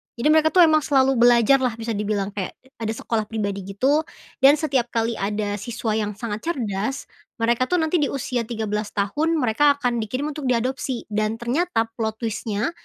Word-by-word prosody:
Jadi 235 Hz, +5 st, 0 dB
mereka, 315 Hz, 0 st, +5 dB
tuh, 355 Hz, +3 st, +6 dB
emang 310 Hz, -1 st, +5 dB
selalu 270 Hz, -3 st, +2 dB
belajar 240 Hz, +2 st, +5 dB
lah 250 Hz, -3 st, 0 dB
bisa 230 Hz, 0 st, -4 dB
dibilang. 205 Hz, -1 st, -2 dB
Kek, 195 Hz, -2 st, -5 dB, 0.2 s
ada 225 Hz, -, -3 dB
sekolah 220 Hz, -1 st, -2 dB
pribadi 205 Hz, -3 st, -3 dB
gitu 260 Hz, +10 st, +2 dB, 0.4 s
dan 275 Hz, +2 st, +7 dB
setiap 275 Hz, -6 st, 0 dB
kali 230 Hz, -1 st, -1 dB
ada 205 Hz, 0 st, -2 dB
siswa 230 Hz, +1 st, -3 dB
yang 210 Hz, -1 st, -1 dB
sangat 215 Hz, -1 st, -4 dB
cerdas, 225 Hz, -, -3 dB, 0.3 s
mereka, 235 Hz, +2 st, +1 dB
tuh 360 Hz, -, +1 dB
nanti 320 Hz, +1 st, +1 dB
di 290 Hz, -, +2 dB
usia 245 Hz, -4 st, -3 dB
13 215 Hz, -2 st, -3 dB
tahun, 295 Hz, +12 st, 0 dB
mereka 285 Hz, +1 st, +3 dB
akan 245 Hz, -3 st, 0 dB
dikirim 255 Hz, +7 st, -3 dB
untuk 290 Hz, -2 st, -5 dB
diadopsi 255 Hz, +1 st, -1 dB
dan 215 Hz, +1 st, 0 dB
ternyata 240 Hz, +3 st, 0 dB, 0.2 s
plot 220 Hz, -1 st, -1 dB
twist-nya. 220 Hz, +3 st, -2 dB
235 Hz, 175 wpm, -23 LUFS, 215-275 Hz, 0.4 s, dan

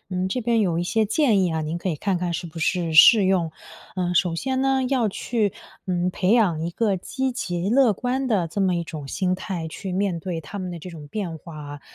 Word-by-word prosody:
嗯， 185 Hz, 0 st, -1 dB
这 250 Hz, +6 st, -2 dB
边 230 Hz, 0 st, +2 dB
有 175 Hz, -5 st, +1 dB
一 175 Hz, -, -1 dB
些 220 Hz, +4 st, +1 dB
建 220 Hz, -, +3 dB
议 180 Hz, -, +1 dB
啊， 160 Hz, -, -1 dB
您 155 Hz, +2 st, -3 dB
可 175 Hz, +2 st, -3 dB
以 165 Hz, -, -1 dB
看 195 Hz, +4 st, -1 dB
看 175 Hz, -1 st, -2 dB
是 170 Hz, +1 st, -3 dB
不 165 Hz, 0 st, -8 dB
是 170 Hz, 0 st, 0 dB
适 205 Hz, +6 st, +8 dB
用。 185 Hz, -4 st, +2 dB, 0.5 s
呃， 180 Hz, -1 st, -1 dB
首 170 Hz, -1 st, +2 dB
先 260 Hz, +7 st, -1 dB
呢， 270 Hz, -1 st, +2 dB
要 250 Hz, -5 st, +2 dB
去， 210 Hz, 0 st, -1 dB, 0.3 s
嗯， 180 Hz, -1 st, 0 dB
培 185 Hz, -, 0 dB
养 185 Hz, -9 st, +3 dB
一 170 Hz, -, -2 dB
个 205 Hz, +2 st, 0 dB
积 260 Hz, +8 st, -3 dB
极 180 Hz, -6 st, -2 dB
乐 250 Hz, -1 st, +4 dB
观 255 Hz, +5 st, -2 dB
的 195 Hz, -7 st, +1 dB
这 165 Hz, +5 st, -4 dB
么 185 Hz, -2 st, +2 dB
一 170 Hz, -, -2 dB
种 150 Hz, -4 st, -7 dB
心 185 Hz, +4 st, 0 dB
态， 180 Hz, -3 st, -4 dB
去 185 Hz, +4 st, -6 dB
面 185 Hz, -2 st, -1 dB
对 170 Hz, -2 st, -4 dB
他 200 Hz, +7 st, -7 dB
们 185 Hz, -1 st, -4 dB
的 175 Hz, -, -6 dB
这 170 Hz, -, -9 dB
种 155 Hz, -4 st, -10 dB
变 180 Hz, -3 st, -4 dB
化 160 Hz, 0 st, -11 dB
啊。 145 Hz, -1 st, -8 dB
185 Hz, 260 characters per minute, -23 LUFS, 170-215 Hz, 0.5 s, 适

